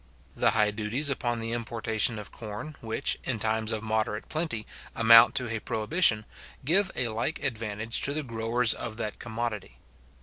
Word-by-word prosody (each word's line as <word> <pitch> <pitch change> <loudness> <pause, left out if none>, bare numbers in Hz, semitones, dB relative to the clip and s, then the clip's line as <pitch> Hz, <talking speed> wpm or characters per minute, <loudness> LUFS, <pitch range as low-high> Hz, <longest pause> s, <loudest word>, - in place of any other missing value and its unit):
The - - +3
high 105 -2 +3
duties 110 +7 -1
upon 120 -3 -1
the 115 0 -3
importation 115 -1 0
of 105 - -8
corn, 115 +8 -8
which, 110 -1 -1
in 125 - -2
times 110 +1 0
of 110 -1 -3
moderate 110 -1 -2
plenty, 155 -10 -2 0.3
amount 115 0 +7
to 125 -2 0
a - - -2
prohibition, 110 - +2 0.4
give 185 +6 +4
a 125 -2 0
like 115 +8 -3
advantage 115 0 -1
to 140 - +3
the 155 - -2
growers 115 -1 +1
of 110 -2 -6
that 110 -3 -4
commodity. 110 - -5
115 Hz, 165 wpm, -27 LUFS, 110-120 Hz, 0.4 s, amount